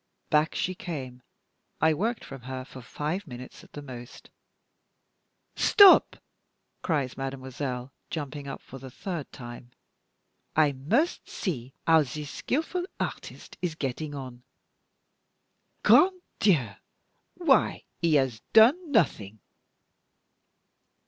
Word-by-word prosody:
Back 155 +1 +3
she 185 - -1
came. 130 -9 -6 0.6
I 160 0 +4
worked 220 +9 -2
from 135 -2 -9
her 130 +1 -6
for 130 - -11
five 150 +9 -4
minutes 125 -1 -10
at - - -19
the 145 - -8
most. 125 -3 -11 1.2
"Stop!" 400 -3 +7 0.7
cries 140 -7 -1
mademoiselle, 130 -1 -5 0.2
jumping 145 -2 -5
up - - -7
for 135 - -11
the 130 +1 -9
third 170 +2 -6
time; 120 0 -10 0.9
"I 155 -2 +4
must 210 - 0
see 135 - -4
how 160 -1 +6
this 150 +1 -5
skillful 350 +6 -2
artist - - -6
is 170 -4 -2
getting 145 +1 -4
on. 130 -3 -8 1.4
Grand 370 0 +6 0.2
Dieu! 160 - +3 0.7
why - - +2 0.2
he 165 -2 +2
has 130 -6 +1
done 285 +10 +6
nothing!" 110 - +1
145 Hz, 110 wpm, -27 LUFS, 130-175 Hz, 1.4 s, Stop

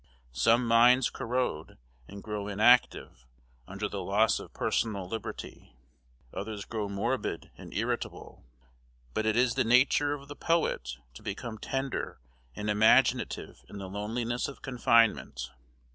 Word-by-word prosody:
Some 115 - +3
minds 120 +2 +5
corrode, 120 -10 -3 0.3
and 100 0 -10
grow 105 -2 -4
inactive, 105 - +3 0.4
under - - -4
the - - -5
loss - - +2
of - - -10
personal 100 -5 -1
liberty; 105 - -7 0.6
others 105 0 -5
grow 105 -3 -4
morbid 115 +6 -2
and - - -11
irritable; - - -4 0.7
but 110 - -1
it 110 - +2
is 125 0 +3
the - - +1
nature 130 +5 +4
of 140 -1 -12
the 145 - -8
poet 65 - 0 0.2
to - - -12
become 110 -2 -6
tender 135 - -3 0.4
and 105 - -5
imaginative 105 +1 +2
in 100 - -9
the 100 -1 -6
loneliness 115 +5 -2
of 140 - -10
confinement. 115 - +2
110 Hz, 130 wpm, -29 LUFS, 100-125 Hz, 0.7 s, minds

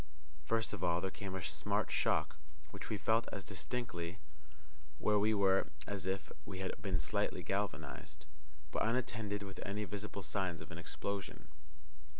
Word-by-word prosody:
First 115 +3 +2
of 90 - -3
all 85 -1 +4
there 95 +1 -1
came 100 -1 -4
a 95 - -2
smart 80 - +1
shock - - +3 0.4
(which - - -6
we 110 - +1
felt 110 +3 +3
as 100 - -3
distinctly 95 -4 -3 0.8
where 105 +5 +4
we 105 +2 +5
were 95 -1 +5 0.2
as 100 -3 -3
if 95 +1 -1
we 95 - -5
had 95 0 -1
been - - +1
slightly - - +1
galvanized), 75 -1 -2 0.5
but - - 0
unattended 110 -3 +1
with 95 -2 -7
any 105 +2 -1
visible 100 0 -4
signs 90 -1 0
of 80 - -8
an 85 - -5
explosion. 95 -2 -3
100 Hz, 155 wpm, -38 LUFS, 90-105 Hz, 0.8 s, we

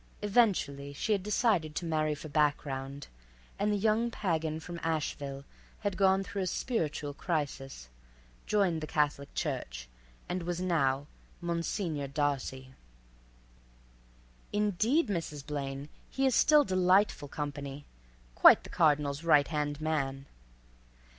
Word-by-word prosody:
Eventually 190 - +2
she 175 +9 -2
had 200 -2 +2
decided 195 -6 +1
to 175 - -2
marry 155 -2 0
for 155 - -9
background, 140 -2 -1 0.5
and 205 +1 +1
the 205 - +1
young 220 +3 +2
pagan 160 -7 -1
from 170 +1 -7
Asheville 145 -4 -3 0.4
had 205 -3 -1
gone 190 0 +3
through 195 +1 -4
a 185 - -1
spiritual 155 - -2
crisis, 140 - -3 0.6
joined 190 -6 +2
the 155 - -4
Catholic 145 -2 0
Church, - - -3 0.4
and 180 0 -2
was 175 0 -3
now—Monsignor 165 +1 -2
Darcy. 135 -2 -2 1.8
"Indeed, 210 - +2
Mrs. 160 -7 -4
Blaine, 140 -1 -4 0.2
he 270 - 0
is 260 - +3
still 300 +3 +6
delightful 185 - +2
company—quite 135 - +1
the - - -11
cardinal's 150 -1 +2
right 150 -4 +4
hand 150 -2 -2
man." 140 -4 -2
155 Hz, 115 wpm, -31 LUFS, 140-190 Hz, 1.8 s, still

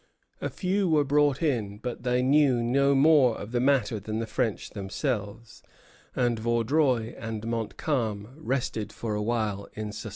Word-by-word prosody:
A - - -2
few 190 0 0
were 155 -2 +4
brought 145 +1 +2
in, 110 -9 -1
but 120 +3 -5
they 125 0 +1
knew 135 -3 +4
no 140 +3 +3
more 135 -4 +5
of 105 - -8
the 120 - 0
matter 125 -5 +2
than 110 +2 -4
the 115 - -2
French 110 0 -2
themselves; 105 +2 -4 0.5
and 120 -2 +1
Vaudreuil 120 +1 +1
and 115 -1 -5
Montcalm 115 -1 -2
rested 120 -7 -2
for 110 -2 -4
a 105 - -1
while 105 -3 -1
in 105 0 -5
suspense. 110 +1 -7
120 Hz, 160 wpm, -27 LUFS, 110-140 Hz, 0.5 s, more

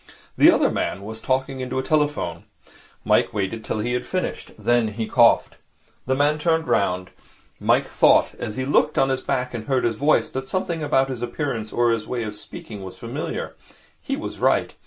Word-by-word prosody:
The - - +7
other - - +4
man 95 +3 -2
was 110 +2 -7
talking 135 0 -1
into 130 0 -3
a 130 - 0
telephone. 145 - 0 0.6
Mike - - +2
waited 105 +2 -2
till - - -3
he 120 +3 -1
had 125 0 -1
finished. 185 -1 -3
Then 120 -1 +2
he 110 +1 -3
coughed. - - +4 0.5
The 130 - +2
man 145 +2 +2
turned 160 0 +1
round. 90 -2 0 0.5
Mike - - +3
had - - -15
thought, - - +4
as 105 - -4
he 130 0 -2
looked 150 +2 +2
at 135 - +3
his 130 0 -1
back 125 0 -2
and 110 -2 -5
heard 130 -2 +1
his 115 -2 0
voice, 145 +4 +2
that 130 0 -4
something 175 +1 -2
about 135 -2 +2
his 125 -3 -5
appearance 120 -4 -3
or 120 -1 +2
his 115 -2 -2
way 120 -2 -2
of 105 -1 -5
speaking 105 -1 -9
was 95 -1 -9
familiar. - - -5 0.5
He - - -3
was - - -6
right. - - +2
125 Hz, 200 wpm, -23 LUFS, 110-140 Hz, 0.6 s, The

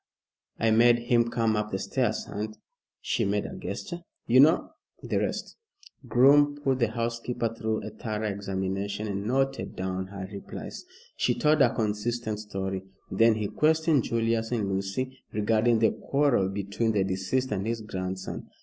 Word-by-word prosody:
I 115 0 +2
made 120 +2 +6
him 120 -1 +2
come 115 -2 +1
up 105 0 -1
the 95 - -2
stairs - - -1
and" 110 +1 -5 0.4
she - - 0
made - - 0
a - - -6
gesture 175 -1 -5 0.3
"you 125 +2 +5
know 155 +5 +5 0.3
the - - 0
rest." - - -3 0.5
Groom 145 +4 +5
put 135 -3 0
the 120 - +3
housekeeper 115 +1 -2
through 110 -1 -2
a 105 - -6
thorough 110 0 -3
examination, 100 +1 -3
and 100 0 -3
noted 135 +2 0
down 95 0 -3
her 100 -1 -7
replies. 100 - -7 0.3
She - - +2
told 150 -1 +3
a 125 -3 +4
consistent 110 0 -1
story. 95 -2 -4 0.3
Then 115 +4 +4
he 105 -1 -1
questioned 160 -2 +3
Julius 115 0 0
and 110 -5 0
Lucy 100 +7 -3
regarding 110 +2 +3
the 110 0 +4
quarrel 135 -9 +1
between 100 +3 -1
the 100 -2 +2
deceased 95 +7 -1
and 100 0 -1
his 115 0 -2
grandson. 95 -3 -5
110 Hz, 160 wpm, -27 LUFS, 100-120 Hz, 0.5 s, made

